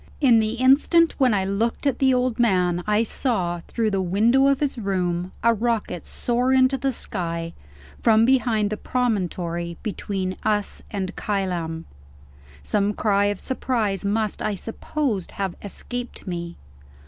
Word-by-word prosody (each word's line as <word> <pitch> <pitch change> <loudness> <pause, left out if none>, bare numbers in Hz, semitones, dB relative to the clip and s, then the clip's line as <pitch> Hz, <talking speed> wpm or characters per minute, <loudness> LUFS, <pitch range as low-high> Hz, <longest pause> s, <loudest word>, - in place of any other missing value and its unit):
In 245 -6 +5
the 220 0 0
instant 275 +7 +4
when 260 -3 +4
I 195 -3 +1
looked 220 +7 -1
at 275 - +1
the 265 -1 +4
old 250 -2 +1
man, 180 -6 +2
I 210 +1 +3
saw, 190 -8 -1
through 225 -2 -1
the 195 -1 0
window 225 +9 +3
of 275 -1 +3
his 285 -4 -1
room, 180 -3 -1
a 230 0 +5
rocket 225 -6 -2
soar 245 +2 0
into 260 0 +4
the 270 0 -1
sky, 170 -7 -4 0.5
from 225 -1 +5
behind 225 -5 +2
the 215 - -2
promontory 175 -9 -2
between 190 -3 -3
us 210 -2 -1
and 195 -2 -4
Kylam. 175 -5 -2 0.8
Some 205 - 0
cry 200 -2 +2
of 205 -1 -1
surprise 230 -7 -1
must, 210 +1 -1
I 210 - -1
suppose, 225 - -3
have 195 -3 -2
escaped 245 +4 -6
me. 170 -2 -5
210 Hz, 150 wpm, -23 LUFS, 185-245 Hz, 0.8 s, In